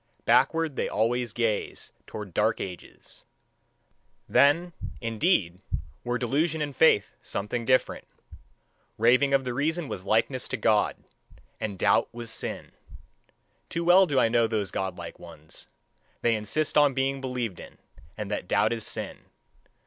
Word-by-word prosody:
Backward 160 -3 +3
they - - -1
always 120 +2 0
gaze 115 -2 -2 0.2
toward 105 -4 -8
dark - - +1
ages: 90 -2 -9 1.0
then, 165 +5 +3 0.3
indeed, 115 - +1 0.4
were 120 0 -1
delusion 145 +6 0
and 145 -2 -3
faith 130 -9 +4
something 115 +4 -4
different. 130 +2 +1 0.9
Raving 125 +5 +4
of 135 -1 +3
the 125 - -2
reason 155 +5 -1
was 95 - -6
likeness 115 +6 +1
to 135 - -3
God, 105 -1 +2 0.6
and 100 -3 -4
doubt - - +2
was 115 -1 -6
sin. - - -4 1.0
Too 170 - -2
well 180 +2 +6
do 140 -4 +2
I - - +4
know 115 0 +3
those 105 -3 -2
godlike 95 -1 -5
ones: 80 +1 -12 0.6
they 120 - +3
insist 140 +9 0
on 145 -3 +4
being 135 0 0
believed 125 -7 -3
in, - - -12 0.4
and 105 -1 -5
that 95 - -3
doubt 105 +5 +2
is 115 -2 -4
sin. - - -4
120 Hz, 140 wpm, -27 LUFS, 105-140 Hz, 1.0 s, well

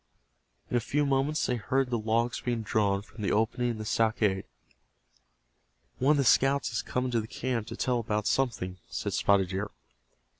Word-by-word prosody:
In - - 0
a - - +4
few 145 +6 0
moments 140 +2 +1
they 125 - 0
heard 130 +3 0
the 120 - +1
logs 115 +2 0
being 120 -2 -2
drawn 100 -2 +1
from 110 +1 -12
the 100 - 0
opening 115 +3 +1
in 115 - -3
the 110 - -6
stockade. 110 -4 +1 1.5
"One 140 +4 +4
of - - +1
the 140 - +3
scouts 135 +3 +3
has 115 - -1
come 125 0 -2
into 120 -3 0
the 110 - -8
camp 120 -2 -3
to - - -6
tell 125 -1 +1
about 105 -2 -1
something," 95 -9 0
said - - -3
Spotted 100 -2 +3
Deer. 100 +2 -3
115 Hz, 185 wpm, -29 LUFS, 105-130 Hz, 1.5 s, a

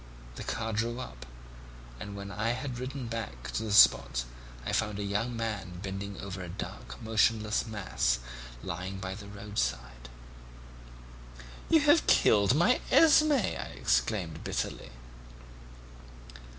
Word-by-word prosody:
The - - -8
car 115 0 -3
drew 115 +3 -1
up, 60 - -8 0.7
and 100 - -7
when 100 0 -7
I 115 +3 0
had 125 -1 -5
ridden 130 0 -5
back 110 - -5
to - - -2
the 110 -2 -4
spot - - +6 0.4
I - - -2
found 105 -2 0
a 105 - -3
young 110 +4 -2
man 105 -6 -4
bending 100 +1 -5
over 95 -1 -6
a 90 - -6
dark 60 -8 -7
motionless 110 0 +2
mass 100 - 0 0.5
lying 90 +3 -4
by 95 0 -4
the 100 +1 -9
roadside. 65 - -4 1.6
"'You 320 -2 +6
have 295 +3 +4
killed 105 +3 +5
my 175 +11 +3
Esmé,' 305 -5 +5
I - - -8
exclaimed 80 - 0
bitterly. - - -3
105 Hz, 130 wpm, -30 LUFS, 90-115 Hz, 1.6 s, spot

